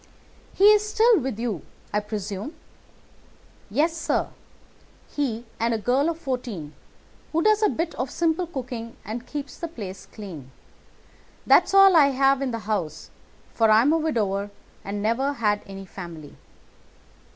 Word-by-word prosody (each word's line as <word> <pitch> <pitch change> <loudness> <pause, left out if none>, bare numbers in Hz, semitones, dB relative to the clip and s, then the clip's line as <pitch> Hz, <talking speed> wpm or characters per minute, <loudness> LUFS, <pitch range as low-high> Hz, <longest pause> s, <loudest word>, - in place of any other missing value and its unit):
"He 390 - +1
is 420 0 +4
still 450 -1 +4
with 260 -5 -3
you, 225 -8 -2 0.3
I 210 - +3
presume?" 210 - -5 1.1
"Yes, 305 +10 +1
sir. 330 - -1 0.8
He 240 -5 -2
and 230 0 +1
a - - 0
girl 255 +8 +1
of 330 - -3
fourteen, 240 - -4 0.6
who 330 +1 +1
does 430 0 +4
a 425 - +4
bit 330 +1 -2
of 255 +1 -3
simple 335 +3 0
cooking 245 -6 -6
and 235 +3 -6
keeps 285 -1 -6
the 335 - -3
place 200 - -8
clean—that's 170 - -3
all 390 -2 +8
I 295 -4 +7
have 270 0 +3
in 270 - 0
the 230 - -2
house, 180 -8 -3 0.4
for 225 -1 +3
I 215 +1 +6
am 290 +4 +4
a 325 - +2
widower 205 -10 -1 0.3
and 200 +1 -4
never 260 +6 +1
had 210 -5 0
any 195 0 -8
family. 170 -5 -9
240 Hz, 150 wpm, -25 LUFS, 205-310 Hz, 1.1 s, all